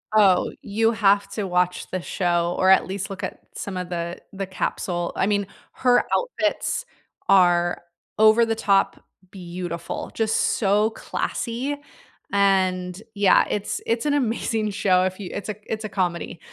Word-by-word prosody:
Oh, 195 -4 +4
you 225 +3 +1
have 200 -3 +3
to 205 0 -2
watch 180 0 0
the 185 - -2
show, 175 -1 0
or 185 - +3
at 190 - +5
least 195 +2 -4
look 195 -4 -7
at - - -5
some 195 -2 -5
of 180 -1 -4
the 170 0 -3 0.2
the 195 0 -4
capsule. 175 -2 -2
I 185 - +1
mean, 205 -1 +1 0.3
her 250 -1 +3
outfits - - -1 0.4
are 175 -2 +4 0.4
over-the-top 220 -2 +3 0.3
beautiful, 175 -2 -6
just 220 -1 +1 0.2
so 210 +1 +3
classy. 245 +5 -3 0.6
And, 185 -2 +2 0.2
yeah, 200 -1 +5
it's 205 -1 -2
it's 230 +3 0
an 290 - +2
amazing 225 -4 0
show 185 -2 +2
if 185 +1 -2
you 190 -3 -6
it's 205 +1 -5
a 210 - -2 0.2
it's 220 0 -2
a - - -4
comedy. 175 -3 -2
195 Hz, 150 wpm, -23 LUFS, 180-215 Hz, 0.6 s, at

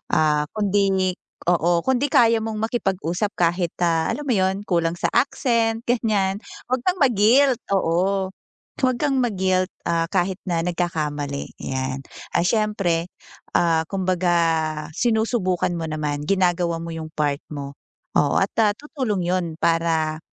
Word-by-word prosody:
ah, 150 -1 +2
kundi, 195 -2 +2 0.4
oo, 170 0 +2
kundi 265 +2 +1
kaya 230 -3 +4
mong 220 -1 -3
makipag-usap 195 -4 -1
kahit 175 0 +1
na 165 -2 +1
alam 295 - -6
mo 275 - -1
'yun, 190 -3 +2
kulang 170 -3 0
sa - - -1
accent 230 -4 +1
ganiyan, 210 -5 +1 0.3
huwag 255 - +2
kang 365 0 +1
ma-guilt, 250 +2 +4 0.2
oo. 190 +2 +1
Oh, 265 - -19
huwag 255 -1 +3
kang 275 -3 +2
ma-guilt, 185 -5 +1 0.2
ah, 165 0 0
kahit 180 +2 0
na 170 -2 0
nagkakamali 150 -5 -3
'yan. 130 0 -3 0.3
Ah, - - +1
siyempre, 195 -6 0 0.4
ah, 165 -2 +2
kumbaga 185 -2 0 0.6
sinusubukan 220 -6 +1
mo 165 -1 -3
naman, 150 -1 -2
ginagawa 175 -2 +1
mo 165 0 -6
'yung 160 -1 -6
part 145 -2 -1
mo, 140 -1 -6 0.4
oo, 145 - +3
at 195 - +1 0.3
tutulong 260 - -2
'yun 180 0 +1
para 160 -2 +1
185 Hz, 135 wpm, -22 LUFS, 165-220 Hz, 0.6 s, kaya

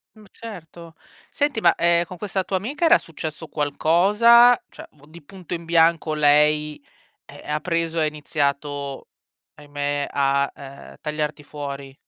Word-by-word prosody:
Mh, 215 - -17
certo. 170 -6 -11 0.4
Senti, 290 -5 -1
ma, 170 -4 +4
ehm, 170 0 +3
con 180 +2 -10
questa 190 -1 -3
tua 190 - -2
amica 280 - -3
era 335 +1 +6
successo 160 0 -8
qualcosa, 210 +12 +4
cioè - - -12
m 145 -1 -21
di 165 +1 -14
punto 180 +1 -9
in 170 0 -8
bianco 165 -1 +2
lei, 150 0 +2 0.4
eh, - - -14
ha 150 0 -2
preso 165 -1 -1
e - - +2
ha - - +2
iniziato, 145 -2 -3 0.5
ahimè, 145 -1 -4
a, 140 0 +1
ehm, 140 0 -12
tagliarti 150 -1 -4
fuori? 140 -2 -8
155 Hz, 150 wpm, -22 LUFS, 145-175 Hz, 0.5 s, era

